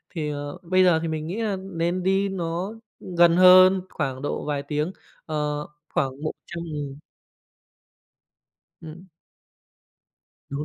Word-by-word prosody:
thì, 155 -3 -2
ờ, 145 +2 -5
bây 185 +2 +3
giờ 175 -3 +4
thì 165 - -2
mình 155 -1 -3
nghĩ 195 +7 -3
là 210 -3 0
nên 180 -1 -2
đi 195 +1 +2
nó 180 +2 -3 0.4
gần 170 0 +6
hơn, 185 +1 +8
khoảng 135 -4 -3
độ 145 - -3
vài 145 -1 -2
tiếng, 150 +3 -2 0.3
ờ, 150 -1 -2 0.3
khoảng 135 +2 -1
100.000. 155 -3 -6 1.8
Ừm. 165 +3 -11 1.4
Đúng 140 +2 -4
165 Hz, 125 wpm, -24 LUFS, 150-185 Hz, 1.8 s, hơn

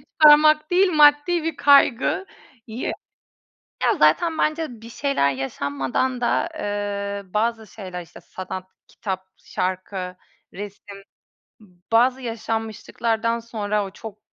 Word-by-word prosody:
çıkarmak 305 +1 +5
değil, 370 +1 +4
maddi 300 +3 +5
bir 325 -2 -2
kaygıyı 265 - +1 0.9
Ya, - - +3
zaten 330 -2 +3
bence 305 -8 -1
bir 230 - -11
şeyler 255 - 0
yaşanmadan 140 - -2
da, 245 +7 +1
eee, 200 -3 -4
bazı 225 0 0
şeyler, 185 -4 -8
işte, 170 0 -14
sanat, 185 0 -7 0.2
kitap, 190 -2 -5
şarkı, 185 0 -4 0.4
resim, 200 0 -9 0.6
b - - -17 0.3
bazı 250 +3 +4
yaşanmışlıklardan 225 0 -2
sonra 210 -3 -2
o 195 - -7
çok 215 +1 -10
225 Hz, 110 wpm, -23 LUFS, 195-280 Hz, 0.9 s, çıkarmak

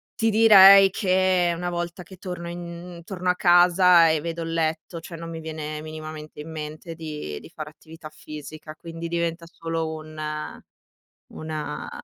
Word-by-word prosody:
Ti 225 0 +1
direi 200 -3 +8
che 185 -3 +2
una 175 +1 -3
volta 175 +1 -4
che 185 +2 -14
torno 180 -2 -6
in 175 0 -8
torno 180 -2 -3
a 180 - +3
casa 175 -1 +5
e 160 -1 +2
vedo 165 0 -4
il 165 - -5
letto, 160 +1 -2
cioè 165 0 -9
non 165 0 -8
mi 165 -1 -6
viene 155 -1 -6
minimamente 155 -1 -8
in 160 +2 -9
mente 155 +2 -7
di 150 - -6
di - - -13
fare 155 -1 -8
attività 160 0 -13
fisica, 155 0 -10
quindi 165 0 -7
diventa 170 0 -2
solo 165 -1 -4
un 155 0 -11 1.2
una 155 -1 -5
165 Hz, 160 wpm, -24 LUFS, 155-175 Hz, 1.2 s, direi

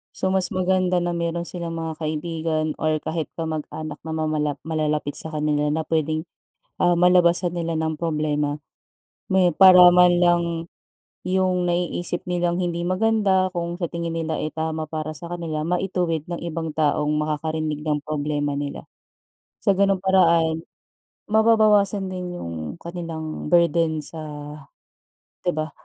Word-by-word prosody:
So 190 - 0
mas 190 -1 +2
maganda 185 -1 +1
na 175 - -1
mayro'n 170 0 -2
silang 170 -1 -5
mga 160 -1 -5
kaibigan 155 0 -2
or 155 0 +1
kahit 160 -1 -2
kamag-anak 155 -1 -5
na 160 - -3
mamalap 155 -2 -1
malalapit 150 -2 -1
sa - - -3
kanila 150 -1 +1
na 155 +2 0
puwedeng, 155 0 -1 0.6
ah, 175 -1 +4
malabasan 175 0 +4
nila 170 -1 -2
ng 160 0 -2
problema. 150 -3 -1 0.7
May 185 -3 +3
para 180 0 +8
man 180 0 +6
lang, 175 -1 +4 0.8
yung 185 -1 +1
naiisip 175 0 -1
nilang 175 0 0
hindi 170 -1 -2
maganda 190 0 +2
kung 170 +1 -3
sa 170 - -1
tingin 170 0 -4
nila, 160 -1 -2
eh, 155 - -3
tama 160 0 -3
para 155 0 -4
sa 170 +4 -8
kanila 165 -3 -3
maituwid 175 -2 -1
ng 175 -1 -5
ibang 165 -2 -4
taong 150 -1 +1
makakarinig 155 0 -2
ng 150 -1 0
problema 145 -1 -2
nila. 145 -1 -5 0.8
Sa 200 -3 +2
ganung 195 -1 +2
paraan, 170 -4 +3 0.7
mababawasan 215 -3 +4
din 180 -1 -5
yung 80 -3 -6
kanilang 165 -3 -6
burden 165 -2 +3
sa 160 +3 -6 1.2
'di 180 - +1
ba. 155 0 -3
165 Hz, 140 wpm, -23 LUFS, 155-180 Hz, 1.2 s, para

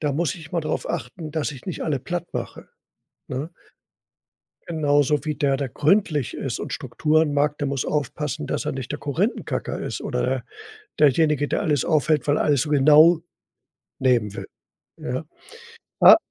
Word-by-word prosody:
da 145 -2 0
muss 160 0 0
ich 155 -1 -12
mal 170 - +1
darauf 155 0 -3
achten, 160 -4 -5
dass 155 -2 -1
ich 130 - -12
nicht 180 - -4
alle 145 -4 0
plattmache, 175 +4 -5 0.6
ne? 140 +6 -4 1.2
Genauso 145 -2 +1
wie 150 -1 -1
der, 140 -2 +1
der 135 -1 -3
gründlich 150 - +1
ist - - -4
und - - -5
Strukturen 155 -1 +1
mag, 145 +1 +1
der 145 - -2
muss 135 -2 -2
aufpassen, 150 0 -2
dass - - -3
er - - -1
nicht 130 -1 -5
der 150 - -5
Korinthenkacker 170 - -2
ist - - -4
oder - - -1 0.6
derjenige, 150 0 +3
der - - -1
alles 150 -4 +1
aufhält, 155 -3 +1
weil 145 - +3
er - - +1
alles 145 -4 +3
so 150 - -2
genau 150 +4 +6 0.8
nehmen 120 -6 +2
will, - - -6 0.5
ja? 130 +5 -4 0.8
Ah - - +10
150 Hz, 160 wpm, -23 LUFS, 140-155 Hz, 1.2 s, Ah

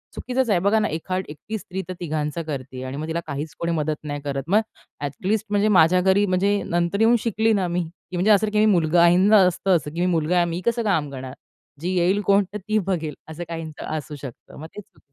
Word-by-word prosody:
चुकीचंच 255 -1 -1
आहे. 190 - +3
बघा 200 +4 +3
ना, 215 - +1
एखादी 185 +4 -3
एकटी 220 +8 -6
स्त्री 190 -1 -6
तर - - -3
तिघांचं 155 -1 -2
करते 135 -4 -6
आहे 130 - -5
आणि 130 +2 -5
मग 155 +2 -4
तिला 165 +1 -2
काहीच 150 +2 -5
कोणी 170 0 -1
मदत 155 -1 -1
नाही 145 -1 -5
करत. 140 -1 -3
मग 195 +5 +4 0.4
अ‍ॅटलीस्ट 190 +10 -2
म्हणजे 205 +1 +2
माझ्या 180 +3 +5
घरी 190 +2 +3
म्हणजे 200 +2 +1
नंतर 175 +4 0
येऊन 230 +2 +5
शिकली 220 0 +1
ना 190 -3 +1
मी 175 +1 -1 0.3
की - - -5
म्हणजे 205 +5 +3
असं, 210 +1 +4
की 210 - +1
मी 215 - +5
मुलगा 170 -1 +3
आहे. 170 0 +6
काहींच 200 +3 +4
असतं 185 +1 +1
असं 150 -1 -7
की 170 - -5
मी - - +2
मुलगा 165 +2 +1
आहे 175 - +4
मी 170 +1 -3
कसं 235 0 +1
काम 160 -9 0
करणार? 130 -1 -7 0.5
जी 175 - -2
येईल 185 +4 +2
कोण 200 +1 +4
तर - - -2
ती 215 +2 -1
बघेल, 165 -6 -1 0.2
असं 160 +2 -6
काहीचं 160 -2 -6
असू 150 0 -7
शकतं. 130 -5 -10
मग 160 - -8
ते 210 - -6
चुकीचं 190 -6 -26
175 Hz, 240 wpm, -23 LUFS, 155-205 Hz, 0.5 s, आहे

